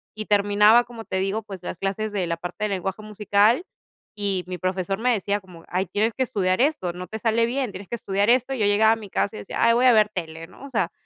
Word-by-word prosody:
Y 215 - -5
terminaba, 210 +3 +5
como 235 -2 -10
te 190 - -3
digo, 195 +3 -1
pues, 195 -4 -10
las 175 - -6
clases, 200 +2 -2
de 195 -4 -2
la 170 0 -2
parte 180 +5 -4
de - - -1
lenguaje 195 +1 -3
musical 210 - +2 0.5
y 200 -3 -1
mi 180 -1 -5
profesor 185 +1 -2
me 250 +2 +2
decía 205 -1 -1
como: 180 -4 -15
"Ay, 185 +1 -1
tienes 220 +3 0
que 260 - -5
estudiar 185 -3 0
esto, 255 - 0
no 180 +1 -7
te 220 - -6
sale 230 +1 +1
bien, 255 -2 -2
tienes 190 0 -9
que 235 - -3
estudiar 200 0 0
esto", 255 +2 +3
y 255 - -4
yo 205 - +2
llegaba 220 +2 +4
a 225 - +3
mi 210 -3 -10
casa 205 +3 -1
y - - -6
decía: - - -7
"Ay, 230 0 +5
voy 245 +2 +3
a 250 - +7
ver 215 -1 +4
tele, 165 -4 -6
¿no?" - - -16
O - - -9
sea, 195 -9 -1
205 Hz, 265 wpm, -24 LUFS, 190-225 Hz, 0.5 s, a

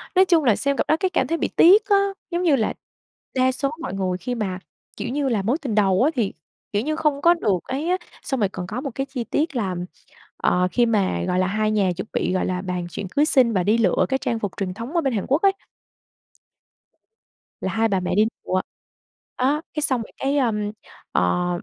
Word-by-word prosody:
Nói 375 - +6
chung 340 -4 +3
là 230 -6 +4
xem 280 -1 -1
cặp - - 0
đó 315 - +3
cái 375 - +1
cảm - - 0
thấy 330 - 0
bị - - 0
tiếc 395 +5 +6
á, 400 -1 +4 0.3
giống 345 +1 -1
như 315 -6 +4
là, 220 -4 0 0.6
đa 260 0 +3
số 275 +1 -1
mọi - - -4
người 185 -2 -1
khi 245 +6 -4
mà, 190 -5 -3 0.4
kiểu 235 - -4
như 280 0 0
là, 215 -4 +1
mối 240 +10 +1
tình 240 -7 -2
đầu 195 0 +3
á 300 - +3
thì, 225 -6 0 0.4
kiểu 205 - +2
như, 310 +3 -1
không 300 -3 0
có 340 +3 +6
được 210 - 0
ấy 285 +6 -3
á, 365 - +2 0.3
xong 265 -3 -2
rồi 205 -3 +2
còn 180 -2 -6
có 230 +7 -4
một 275 -2 -4
cái 270 - -1
chi 265 -3 -4
tiết 305 +5 -1
là, 195 -7 -1 0.6
ờ, 180 0 +2
khi 240 - +3
mà, 195 - +1
gọi 180 - +1
là, 185 - +2
hai 215 +2 0
nhà 200 -4 +2
chuẩn 190 - -4
bị, - - 0
gọi 185 - 0
là, 180 0 -2
bàn 180 -2 -3
chuyện 200 - -5
cưới 290 +7 +2
xin 255 -6 +3
và 185 -3 +1
đi 210 +5 +3
lựa 205 -6 +3
cái 265 - +2
trang 230 -3 -2
phục 205 -3 -3
truyền 185 -2 -2
thống 230 - -7
ở 340 - +3
bên 270 -4 0
Hàn 205 -4 -1
Quốc 285 +5 +2
ấy 395 - +5 2.1
là 190 - -2
hai 225 +2 +2
bà 195 -3 +1
mẹ 180 - -2
đi 210 +2 +5 0.2
lựa, 185 0 +1 0.8
đó, 280 +4 +1
cái 300 - -2
xong 260 -5 +1
rồi 225 - -9
cái, 275 +2 0
ơm, 210 -6 0 0.4
ờ, 135 - +1
235 Hz, 240 wpm, -23 LUFS, 195-285 Hz, 2.1 s, Nói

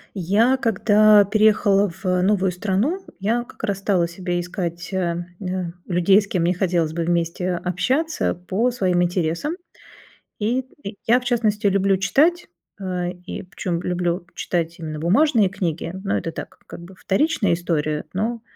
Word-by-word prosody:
Я, 210 +8 +2
когда 215 -2 +5
переехала 205 -1 +3
в 170 - -13 0.2
новую 190 -1 +2
страну, 210 - -1 0.2
я 230 +5 0
как - - -16
раз 195 -1 -1
стала 185 -4 +1
себе 175 0 -3
искать, 175 0 -5
э, 175 -2 -1 0.6
людей, 190 +3 +4
с 200 - -9
кем 180 -4 -1
мне 175 +2 +2
хотелось 170 -4 0
бы 170 0 -1
вместе 170 +1 -1
общаться 255 - -1
по 190 +7 -1
своим 185 -7 +1
интересам. 175 - -1 0.8
И, 230 +5 +1 0.3
э, - - -2 0.2
я, 240 +2 +5
в 250 - -13
частности, 220 -3 0
люблю 195 0 +2
читать, 300 - +2 0.3
а, 180 -2 -3
и 180 +1 -7
причём 180 -1 -4
люблю 175 0 -2
читать 170 -1 -2
именно 155 -2 -5
бумажные 215 - +3
книги, 175 -4 -3
но 200 - 0
это 165 - -3
так, - - -9
как - - -9
бы, 180 +2 -12
вторичная 200 - +1
история, 155 -3 -1
но, 225 +5 -2
190 Hz, 150 wpm, -22 LUFS, 175-215 Hz, 0.8 s, когда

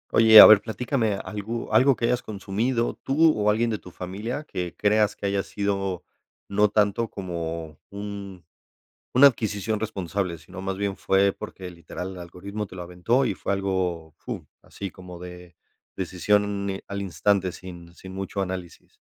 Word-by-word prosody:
Oye, 110 -1 +9
a - - +14
ver 105 -2 +8
platícame 115 -1 -1
algo 105 +4 -5
algo 130 0 +5
que 115 - -1
hayas 125 +1 +1
consumido 110 +4 -1
tú 155 +3 +4
o 105 0 +1
alguien 115 +2 +2
de 105 - -2
tu - - -12
familia 100 - -5
que 90 - -5
creas 105 0 +2
que - - -7
haya 100 0 +1
sido 100 -2 -2 0.4
no 105 +1 +3
tanto 105 +2 +1
como 85 -4 -5
un 100 -3 -7 0.7
una 140 +3 +9
adquisición 110 -3 -2
responsable, 95 -4 -3
sino 90 +4 -10
más 95 0 -3
bien 100 -1 -2
fue 95 0 +2
porque, 90 -1 -8
literal, 90 +2 -7
el - - -9
algoritmo 100 +4 -6
te 95 - -13
lo 90 - -6
aventó 90 +10 +1
y 105 - 0
fue - - -3
algo, 90 -5 -2
fur - - -7 0.2
así 100 -1 -7
como 90 -1 -11
de 90 -1 -10 0.4
decisión 95 +3 +1 0.3
n 95 0 -4
al 100 0 -4
instante 95 0 +1
sin 85 -2 -11
sin 95 +1 -11
mucho 95 +1 -4
análisis. 90 -3 -7
100 Hz, 165 wpm, -25 LUFS, 90-105 Hz, 0.7 s, a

